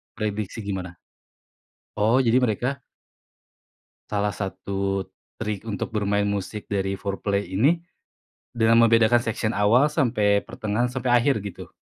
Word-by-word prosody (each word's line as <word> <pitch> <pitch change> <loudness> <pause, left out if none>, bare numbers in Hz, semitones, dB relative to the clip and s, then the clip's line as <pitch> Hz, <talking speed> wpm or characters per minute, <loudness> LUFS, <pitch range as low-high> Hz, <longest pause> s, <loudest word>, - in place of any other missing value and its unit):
Prediksi 105 -1 -3
gimana? 95 -3 -5 1.0
Oh 115 +5 +3
jadi 120 +1 +3
mereka 125 +4 -1 1.3
Salah 105 0 0
satu 95 0 -3 0.3
trik 105 0 -4
untuk 100 -1 -3
bermain 105 -1 0
musik 100 +1 -3
dari 95 -1 0
Foreplay 100 +1 -2
ini 150 - +2 0.7
dengan 115 0 +4
membedakan 115 +1 +5
section 110 -1 -2
awal 120 +8 +3
sampai 110 -9 +2
pertengahan 110 +3 -1
sampai 125 0 -2
akhir 120 -3 +3
gitu? 100 - -8
105 Hz, 115 wpm, -24 LUFS, 100-120 Hz, 1.3 s, membedakan